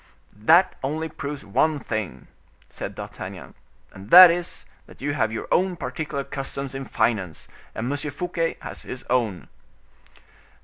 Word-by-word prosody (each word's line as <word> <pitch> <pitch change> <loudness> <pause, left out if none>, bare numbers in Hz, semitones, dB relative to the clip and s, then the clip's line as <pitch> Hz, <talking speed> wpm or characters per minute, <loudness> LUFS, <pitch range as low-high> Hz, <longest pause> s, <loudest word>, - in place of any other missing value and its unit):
"That 170 - +5
only 155 +4 -2
proves 140 -4 -6
one 150 +10 +2
thing," 110 -7 -4 0.4
said - - -6
D'Artagnan; - - -8 0.4
"and 95 +2 -12
that 180 +2 +11
is, 175 +1 -4 0.2
that - - -16
you 145 +1 -2
have 110 -6 0
your 110 - -5
own 185 0 +2
particular 140 -1 -4
customs 135 -1 -5
in 135 0 -5
finance, 110 -8 -1 0.3
and 110 - -3
M. 145 - -1
Fouquet 165 +2 -2
has - - -7
his 130 - -7
own." 115 -8 0
140 Hz, 140 wpm, -24 LUFS, 110-160 Hz, 0.4 s, that